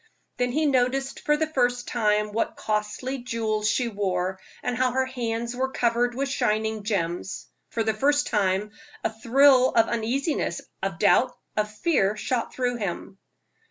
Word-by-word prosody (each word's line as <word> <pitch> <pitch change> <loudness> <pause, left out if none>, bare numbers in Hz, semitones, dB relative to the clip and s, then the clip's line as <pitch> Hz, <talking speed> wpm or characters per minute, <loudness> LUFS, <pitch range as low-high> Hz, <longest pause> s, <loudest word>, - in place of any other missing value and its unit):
Then 245 0 0
he 310 +4 +1
noticed 270 0 +1
for 300 0 +2
the 315 - +1
first 245 -5 0
time 210 -2 +1
what 225 +2 -1
costly 215 +5 -2
jewels 220 -3 -1
she 250 +1 +1
wore, 190 -3 -1 0.2
and 250 - -1
how 255 0 +1
her 260 0 +2
hands 235 -2 -3
were 260 +1 0
covered 240 -1 +1
with 275 +2 -1
shining 220 -4 0
gems. 185 -3 -2 0.2
For 225 - -1
the 220 0 +1
first 285 +6 +2
time 200 0 0 0.3
a - - -1
thrill 255 +3 +5
of 225 - +4
uneasiness, 245 +7 -1 0.2
of - - -2
doubt, - - +3 0.2
of 210 0 0
fear, 210 - +1
shot 240 +2 -2
through 245 -1 -1
him. 195 -2 -5
235 Hz, 160 wpm, -25 LUFS, 210-260 Hz, 0.3 s, thrill